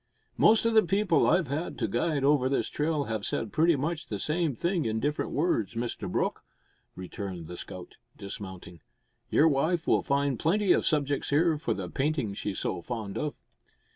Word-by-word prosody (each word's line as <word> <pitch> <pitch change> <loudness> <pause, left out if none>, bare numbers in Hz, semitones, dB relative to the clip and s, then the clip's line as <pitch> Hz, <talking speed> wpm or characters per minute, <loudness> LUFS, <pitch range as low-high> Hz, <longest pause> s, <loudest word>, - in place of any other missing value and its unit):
"Most 220 +1 +5
o' 230 - +3
the 220 -1 +6
people 195 +1 +2
I've 180 -4 +3
had 145 +6 -3
to - - -1
guide 150 -5 0
over 140 -2 +3
this 135 - 0
trail 150 -1 0
have 110 -5 -3
said 110 0 -2
pretty 165 +1 +4
much 160 +3 -3
the 105 - -3
same 155 - -1
thing 170 +3 0
in 110 0 0
different 145 +4 -1
words, 145 - 0
Mr 120 +1 -3
Brooke," - - -1 0.5
returned 95 -2 -6
the 90 - -8
scout, 90 0 -9 0.2
dismounting. 95 -4 -8 0.5
"Your 160 - +5
wife 160 +4 +1
will - - +3
find 140 -3 0
plenty 195 +3 +3
o' - - +2
subjects 145 -3 0
here 160 +3 +3
for - - -1
the - - -4
paintin' 140 -7 -1
she's 100 -1 -4
so - - -2
fond 110 -2 -5
of." 150 -1 -2
145 Hz, 180 wpm, -28 LUFS, 110-165 Hz, 0.5 s, the